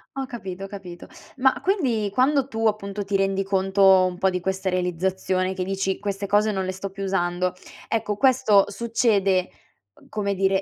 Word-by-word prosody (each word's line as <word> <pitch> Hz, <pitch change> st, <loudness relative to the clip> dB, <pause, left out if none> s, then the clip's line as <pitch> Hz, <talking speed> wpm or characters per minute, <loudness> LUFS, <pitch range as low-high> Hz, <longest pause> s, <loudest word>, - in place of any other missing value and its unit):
Ho 270 Hz, -, -3 dB
capito, 195 Hz, -6 st, -7 dB
ho -, -, -7 dB
capito. 190 Hz, -4 st, -10 dB, 0.3 s
Ma 265 Hz, +1 st, +2 dB
quindi 255 Hz, -, +1 dB
quando 265 Hz, +4 st, +2 dB
tu 225 Hz, -3 st, -3 dB
appunto 205 Hz, -1 st, -2 dB
ti 195 Hz, 0 st, -2 dB
rendi 195 Hz, 0 st, +1 dB
conto 190 Hz, -1 st, +4 dB
un 180 Hz, -1 st, -3 dB
po' 190 Hz, +1 st, +2 dB
di 180 Hz, -, -2 dB
questa 190 Hz, +1 st, -3 dB
realizzazione, 185 Hz, +1 st, -1 dB
che 185 Hz, -1 st, -3 dB
dici: 195 Hz, 0 st, -2 dB
"Queste 200 Hz, -1 st, -3 dB
cose 210 Hz, +2 st, +3 dB
non 190 Hz, -2 st, -2 dB
le 185 Hz, -, -2 dB
sto 190 Hz, +1 st, -6 dB
più 195 Hz, +1 st, -7 dB
usando," 180 Hz, -1 st, 0 dB, 0.3 s
ecco 210 Hz, -2 st, -1 dB
questo 255 Hz, -6 st, +4 dB
succede, 205 Hz, -4 st, +1 dB, 0.6 s
come 205 Hz, -2 st, -1 dB
dire, 190 Hz, 0 st, +1 dB
195 Hz, 175 wpm, -24 LUFS, 190-215 Hz, 0.6 s, conto